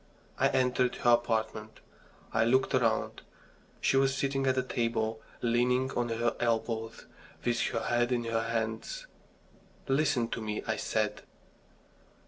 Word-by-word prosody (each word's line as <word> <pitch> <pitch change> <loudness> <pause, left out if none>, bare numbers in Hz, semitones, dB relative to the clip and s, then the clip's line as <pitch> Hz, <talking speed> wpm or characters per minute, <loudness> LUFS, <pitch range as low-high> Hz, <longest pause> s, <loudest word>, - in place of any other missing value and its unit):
I - - +5
entered 125 -1 +1
her 120 - +3
apartment. 110 -2 0 0.5
I - - +3
looked 130 +3 +2
round. 115 -3 +1 0.6
She 135 - +3
was 135 0 +3
sitting 135 0 0
at 130 - +3
the 130 - +1
table, 115 -3 -1 0.2
leaning 125 +2 +2
on 120 -2 -1
her 115 +1 0
elbows, 115 -1 -1 0.4
with 120 0 +1
her 115 - -2
head 120 +1 +1
in 120 -1 +1
her 115 -1 -1
hands. 115 - -3 0.8
"Listen 135 -4 +2
to - - -4
me," 105 -1 -3
I - - 0
said. - - -1
120 Hz, 135 wpm, -30 LUFS, 115-130 Hz, 0.8 s, I